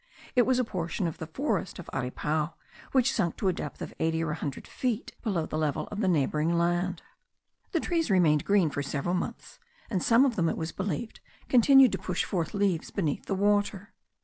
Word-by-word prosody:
It 245 -2 +4
was 260 -1 +3
a 255 - +2
portion 180 -4 -3
of 165 - -3
the 160 - -5
forest 260 - -2
of 180 - -9
Aripao, 150 +5 -2 0.4
which 265 0 +3
sunk 175 -7 0
to - - -4
the 185 - +3
depth 150 -4 -6
of - - -7
eighty 160 0 +1
or 160 - -1
a - - -1
hundred 145 -4 -5
feet 245 -4 -2
below 190 -8 -1
the 155 - -3
level 150 -2 -1
of 210 - -4
the 205 - +1
neighbouring 155 0 +1
land. 175 +1 0 0.7
The 335 - +1
trees 330 -5 0
remained 160 -6 +4
green 195 -6 +3
for 145 - -2
several 140 +5 -2
months; 180 - -4 0.3
and 190 -4 0
some 235 +4 +5
of 245 -5 0
them, 165 -2 +2
it - - -2
was 160 0 -3
believed, 195 +4 -4 0.3
continued 265 0 +7
to - - -2
push 180 -1 -1
forth 175 +1 -2
leaves 195 -5 0
beneath 160 -8 -2
the 195 - 0
water. 205 +1 +1
180 Hz, 205 wpm, -28 LUFS, 160-215 Hz, 0.7 s, continued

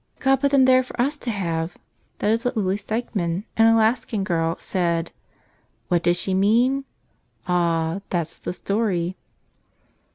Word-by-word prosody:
OD 270 -1 +4
put 280 - +3
them 275 -2 +5
there 255 0 +6
for 255 - -10
us 275 +5 +2
to 250 - -6
have!" 170 -5 -2 0.4
That 210 - +1
is 225 +1 +1
what 245 -2 -1
Lily 190 -2 +1
Stikman, 205 -5 -2
an 225 - +5
Alaskan 225 -1 +2
girl, 165 -3 0
said. 170 -3 -1 0.8
What 175 -2 +2
did 175 0 +3
she 190 +2 -2
mean? 240 +8 +2 0.6
Ah! 170 0 +1
that's 170 -3 -3
the - - -4
story. 185 -2 -1
195 Hz, 150 wpm, -23 LUFS, 175-235 Hz, 0.8 s, there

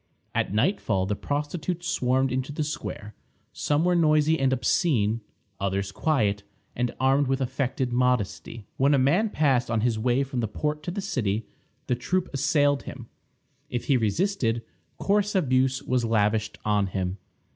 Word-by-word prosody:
At - - 0
nightfall 110 - +1
the 105 +2 -1
prostitutes 150 - -3
swarmed 130 +1 +1
into 130 +2 -2
the 155 +1 -2
square. 105 -7 -5 0.4
Some 150 +3 +1
were 180 - +3
noisy 155 -1 +3
and 135 -1 +2
obscene; 120 - +1 0.4
others 100 0 -1
quiet, 105 -5 +1 0.3
and 125 0 -1
armed 135 +1 +3
with 135 +1 0
affected 130 -1 -1
modesty. 120 -3 0
When 140 +2 +4
a - - +3
man 165 +12 +3
passed 135 - +1
on 115 -2 +1
his 115 -1 +1
way 125 +4 +2
from 135 -2 -4
the 115 - 0
port 150 +7 -2
to - - -2
the 200 +3 -3
city, 110 - -1 0.4
the - - 0
troop 175 +9 -1
assailed 145 0 +2
him. 120 -3 -9 0.6
If 120 - -3
he 140 - +3
resisted, 120 - 0 0.3
coarse 205 +1 +1
abuse 130 -5 +2
was 125 -2 0
lavished 110 -1 +1
on 105 -2 +2
him. 95 0 -3
130 Hz, 155 wpm, -26 LUFS, 115-150 Hz, 0.6 s, When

